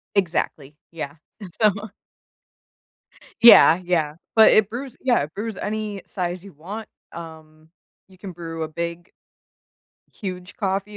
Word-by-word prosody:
Exactly. 160 Hz, -6 st, -1 dB, 0.2 s
Yeah. 145 Hz, -4 st, -6 dB, 0.5 s
So 215 Hz, -1 st, +5 dB, 1.7 s
Yeah. 185 Hz, -7 st, +9 dB
Yeah. 165 Hz, -4 st, 0 dB, 0.2 s
But 220 Hz, -, +8 dB
it 215 Hz, -2 st, +4 dB
brews 250 Hz, +2 st, -7 dB
yeah, 255 Hz, -2 st, +2 dB
it 150 Hz, +2 st, -7 dB
brews 215 Hz, -1 st, -4 dB
any 210 Hz, -2 st, -4 dB
size 180 Hz, -1 st, -4 dB
you 200 Hz, -, -12 dB
want. 200 Hz, +9 st, -8 dB, 0.2 s
Um, 160 Hz, -1 st, -11 dB, 0.4 s
you 185 Hz, -1 st, -20 dB
can 195 Hz, -2 st, -8 dB
brew 165 Hz, -1 st, -6 dB
a 155 Hz, -, -3 dB
big 170 Hz, +2 st, -5 dB, 1.0 s
huge 185 Hz, -3 st, -7 dB
coffee 195 Hz, +1 st, -2 dB
180 Hz, 125 wpm, -23 LUFS, 165-210 Hz, 1.7 s, Yeah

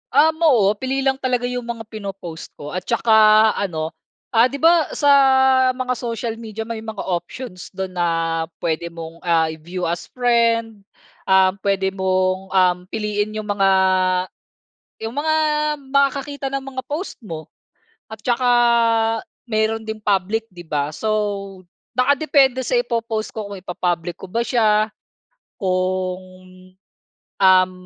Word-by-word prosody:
Um 315 Hz, +2 st, +4 dB
oo, 240 Hz, -12 st, +4 dB
pili 265 Hz, +1 st, -1 dB
lang 270 Hz, 0 st, +1 dB
talaga 250 Hz, -2 st, 0 dB
'yung 245 Hz, -1 st, -3 dB
mga 235 Hz, -1 st, -5 dB
pino-post 195 Hz, -6 st, -8 dB
ko 145 Hz, 0 st, -8 dB
at 185 Hz, 0 st, -5 dB
'tsaka 235 Hz, -1 st, +1 dB, 0.5 s
ano, 160 Hz, -5 st, -2 dB, 0.4 s
ah 230 Hz, +1 st, +5 dB
'di 275 Hz, -, -7 dB
ba 330 Hz, +2 st, +4 dB
sa 285 Hz, -1 st, +3 dB, 0.6 s
mga 255 Hz, 0 st, -1 dB
social 230 Hz, -1 st, -4 dB
media 220 Hz, -1 st, -6 dB
may 225 Hz, 0 st, -5 dB
mga 220 Hz, -2 st, -6 dB
options 180 Hz, +3 st, -5 dB
do'n 190 Hz, 0 st, -4 dB
na 175 Hz, -1 st, 0 dB, 0.6 s
pwede 170 Hz, 0 st, -1 dB
mong, 165 Hz, 0 st, -9 dB
ah 165 Hz, -2 st, +1 dB
i-view 170 Hz, +3 st, -7 dB
as 170 Hz, 0 st, -2 dB
friend. 230 Hz, -3 st, +1 dB, 0.5 s
Ah, 190 Hz, 0 st, +5 dB
pwede 195 Hz, -1 st, 0 dB
mong 185 Hz, 0 st, 0 dB
um, 180 Hz, -1 st, +4 dB
piliin 210 Hz, 0 st, -2 dB
'yung 215 Hz, -, -3 dB
mga, 195 Hz, -1 st, +2 dB, 1.4 s
yung 225 Hz, +3 st, -4 dB
mga 315 Hz, +1 st, +1 dB, 0.6 s
makakakita 280 Hz, 0 st, 0 dB
ng 275 Hz, -, -2 dB
mga 265 Hz, -1 st, -6 dB
post 315 Hz, +7 st, -5 dB
mo. 165 Hz, -, -8 dB, 0.6 s
At 220 Hz, -1 st, -11 dB
'tsaka 245 Hz, 0 st, +1 dB, 1.0 s
meron 220 Hz, 0 st, 0 dB
ding 220 Hz, 0 st, -5 dB
public, 210 Hz, +2 st, 0 dB
'di 180 Hz, -4 st, -12 dB
ba? 150 Hz, -2 st, -2 dB
So, 220 Hz, -, -2 dB, 0.9 s
naka 260 Hz, +3 st, +4 dB
depende 270 Hz, -3 st, +2 dB
sa -, -, +1 dB
ipo-post 230 Hz, -, -2 dB
ko 215 Hz, -2 st, -5 dB
kung 200 Hz, -, -6 dB
ipa-public 175 Hz, -1 st, -2 dB
ko 185 Hz, 0 st, -11 dB
ba 235 Hz, +2 st, -1 dB
siya, 215 Hz, -3 st, +3 dB, 0.7 s
kung, 185 Hz, 0 st, -1 dB, 1.2 s
um, 185 Hz, -1 st, +5 dB
215 Hz, 140 wpm, -20 LUFS, 185-245 Hz, 1.4 s, ah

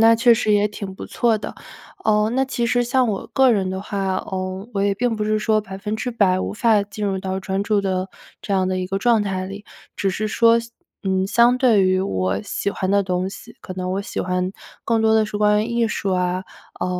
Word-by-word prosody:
那 225 Hz, 0 st, +7 dB
确 240 Hz, +1 st, +5 dB
实 220 Hz, -2 st, +1 dB
也 205 Hz, 0 st, +3 dB
挺 200 Hz, -2 st, -7 dB
不 -, -, -8 dB
错 230 Hz, -3 st, +1 dB
的。 -, -, -7 dB, 0.5 s
呃， 210 Hz, 0 st, +3 dB
那 265 Hz, +3 st, +1 dB
其 245 Hz, -3 st, -2 dB
实 245 Hz, +1 st, +2 dB
像 255 Hz, 0 st, +2 dB
我 200 Hz, -3 st, -3 dB
个 265 Hz, -1 st, +5 dB
人 195 Hz, -4 st, 0 dB
的 190 Hz, 0 st, -4 dB
话， 195 Hz, -2 st, -2 dB
呃， 185 Hz, +2 st, -4 dB
我 195 Hz, -, 0 dB
也 200 Hz, 0 st, +2 dB
并 240 Hz, +3 st, 0 dB
不 210 Hz, -, -2 dB
是 215 Hz, 0 st, +1 dB
说 215 Hz, 0 st, +2 dB
100% 210 Hz, -1 st, -1 dB
无 -, -, -3 dB
法 215 Hz, -1 st, +3 dB
进 205 Hz, +1 st, -6 dB
入 195 Hz, -1 st, -1 dB
到 190 Hz, 0 st, -3 dB
专 190 Hz, 0 st, -2 dB
注 205 Hz, 0 st, +1 dB
的 190 Hz, -1 st, -1 dB, 0.3 s
这 200 Hz, -, -4 dB
样 190 Hz, -1 st, +2 dB
的 185 Hz, 0 st, -1 dB
一 185 Hz, -, -2 dB
个 195 Hz, +1 st, -2 dB
状 230 Hz, 0 st, +3 dB
态 190 Hz, -2 st, -2 dB
里， 200 Hz, +2 st, -8 dB, 0.3 s
只 195 Hz, -, 0 dB
是 215 Hz, +3 st, -2 dB
说 230 Hz, +1 st, +4 dB
西 230 Hz, 0 st, -11 dB, 0.3 s
嗯， 190 Hz, 0 st, +1 dB
相 235 Hz, +3 st, +4 dB
对 235 Hz, -6 st, +4 dB
于 185 Hz, 0 st, +2 dB
我 95 Hz, -, -1 dB
喜 200 Hz, -, -2 dB
欢 190 Hz, -1 st, -2 dB
的 200 Hz, 0 st, +3 dB
东 185 Hz, 0 st, -1 dB
西， 225 Hz, +3 st, -12 dB
可 -, -, -8 dB
能 185 Hz, 0 st, -3 dB
我 195 Hz, +1 st, -2 dB
喜 -, -, -4 dB
欢 180 Hz, 0 st, -1 dB, 0.3 s
更 230 Hz, -1 st, +1 dB
多 220 Hz, 0 st, +4 dB
地 220 Hz, -1 st, +4 dB
是 210 Hz, 0 st, -4 dB
关 210 Hz, 0 st, +3 dB
于 -, -, -4 dB
艺 235 Hz, 0 st, +1 dB
术 200 Hz, -2 st, -2 dB
啊， 180 Hz, 0 st, 0 dB, 0.3 s
啊， -, -, -3 dB
200 Hz, 245 characters per minute, -21 LUFS, 190-225 Hz, 0.5 s, 那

